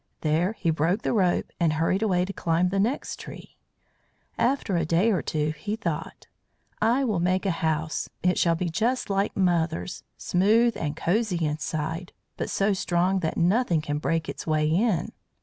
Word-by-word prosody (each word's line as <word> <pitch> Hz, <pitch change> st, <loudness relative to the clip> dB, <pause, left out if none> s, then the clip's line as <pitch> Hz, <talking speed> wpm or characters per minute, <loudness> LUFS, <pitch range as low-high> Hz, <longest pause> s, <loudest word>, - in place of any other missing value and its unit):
There 165 Hz, +6 st, +1 dB
he 170 Hz, -6 st, 0 dB
broke 165 Hz, +7 st, 0 dB
the -, -, 0 dB
rope 185 Hz, -5 st, +1 dB
and 165 Hz, -3 st, +2 dB
hurried 165 Hz, +5 st, +1 dB
away 180 Hz, -5 st, +2 dB
to 195 Hz, -, -6 dB
climb 170 Hz, +1 st, +1 dB
the 195 Hz, +1 st, -1 dB
next 235 Hz, +8 st, -1 dB
tree. -, -, -10 dB, 0.8 s
After 235 Hz, -4 st, 0 dB
a 170 Hz, -, +1 dB
day 170 Hz, +8 st, +2 dB
or 190 Hz, -, +1 dB
two 150 Hz, -1 st, -1 dB
he 180 Hz, +8 st, -4 dB
thought: 175 Hz, -9 st, -4 dB, 0.6 s
"I 235 Hz, +5 st, +3 dB
will 215 Hz, -8 st, 0 dB
make 185 Hz, +2 st, +1 dB
a 195 Hz, -, +2 dB
house. 160 Hz, 0 st, -1 dB
It 180 Hz, 0 st, +2 dB
shall 170 Hz, -1 st, +3 dB
be 175 Hz, +2 st, -2 dB
just 230 Hz, +5 st, 0 dB
like 195 Hz, +1 st, 0 dB
mother's, 175 Hz, -2 st, 0 dB, 0.2 s
smooth 220 Hz, +6 st, +3 dB
and 150 Hz, -1 st, -3 dB
cosy 180 Hz, -2 st, 0 dB
inside, 155 Hz, +3 st, -3 dB, 0.2 s
but -, -, -4 dB
so 200 Hz, +1 st, +1 dB
strong 185 Hz, +1 st, +1 dB
that 160 Hz, -3 st, -2 dB
nothing 180 Hz, 0 st, +2 dB
can 150 Hz, -1 st, -3 dB
break 165 Hz, 0 st, -1 dB
its -, -, -6 dB
way 155 Hz, -1 st, +2 dB
in." 190 Hz, +2 st, +1 dB
180 Hz, 175 wpm, -26 LUFS, 160-205 Hz, 0.8 s, I